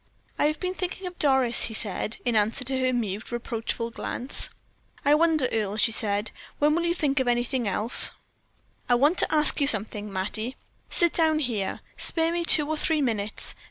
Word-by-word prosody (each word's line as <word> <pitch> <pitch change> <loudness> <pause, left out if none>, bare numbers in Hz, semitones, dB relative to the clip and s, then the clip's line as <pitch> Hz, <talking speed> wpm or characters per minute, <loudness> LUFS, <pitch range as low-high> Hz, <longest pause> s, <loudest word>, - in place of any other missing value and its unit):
"I - - +3
have 305 0 -2
been 365 0 -2
thinking 370 0 -5
of 360 -1 -7
Doris," 265 -4 +3
he 220 - -3
said, 215 +1 -1
in 240 -2 +1
answer 215 +5 +2
to 260 +1 -1
her 255 0 +1
mute, 215 -4 -3
reproachful 230 0 -3
glance. 250 +3 -5 0.6
"I 290 - +5
wonder, 310 -3 +3
Earle," 210 -2 -1
she 225 +2 +3
said, 210 0 +1 0.3
"when 295 +1 +3
you 335 - +1
will 340 0 +1
think 285 -5 0
of 260 - 0
anything 240 0 0
else?" 210 +4 +3 0.8
"I 245 - +5
want 290 +8 +2
to - - +2
ask 300 0 +3
you 280 - +3
something, 210 -3 -1
Mattie. 215 +6 -3 0.3
Sit 345 -1 +5
down 320 -2 +3
here; 235 -10 -2 0.2
spare 325 0 0
me 345 0 -1
two 305 -3 +4
or 315 0 -2
three 310 -1 +1
minutes. 215 -4 -2
255 Hz, 190 wpm, -26 LUFS, 220-305 Hz, 0.8 s, I